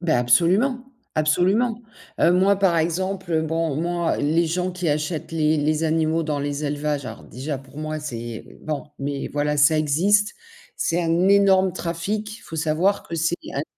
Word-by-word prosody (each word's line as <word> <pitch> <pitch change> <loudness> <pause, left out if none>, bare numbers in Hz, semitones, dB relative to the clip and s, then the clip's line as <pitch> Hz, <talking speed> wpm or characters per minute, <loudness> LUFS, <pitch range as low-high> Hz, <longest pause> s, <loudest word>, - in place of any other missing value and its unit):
Ben, 170 -7 +2
absolument, 180 - +3 0.3
absolument. 195 +10 +2 0.4
Heu, - - +5
moi, 190 +2 +4
par 190 -4 +2
exemple, 180 +2 -2
heu, 160 -1 +2
bon, 160 -2 -1
moi, 170 +1 0
les 160 +4 +1
gens 180 +3 -1
qui 180 -2 -3
achètent 155 +2 -2
les 155 -1 +2
les 155 +1 0
animaux 160 +1 +1
dans 150 -2 -2
les 145 +1 -3
élevages, 145 -1 -2
alors - - -8
déjà 135 +3 -5
pour 135 +2 -13
moi, 155 0 -3
c'est 120 -6 -6 0.2
bon 155 -2 -3 0.2
mais 140 0 -3
voilà, 150 +1 -1
ça 150 +2 +5
existe. 190 +8 +2 0.4
C'est 170 +1 0
un 170 +2 +2
énorme 195 -2 +4
trafic. 205 +6 -4
Faut - - -10
savoir 160 +6 +1
que 165 - -6
c'est 165 +1 +1 0.2
un - - -3
des 145 - -2
165 Hz, 175 wpm, -23 LUFS, 150-180 Hz, 0.4 s, Heu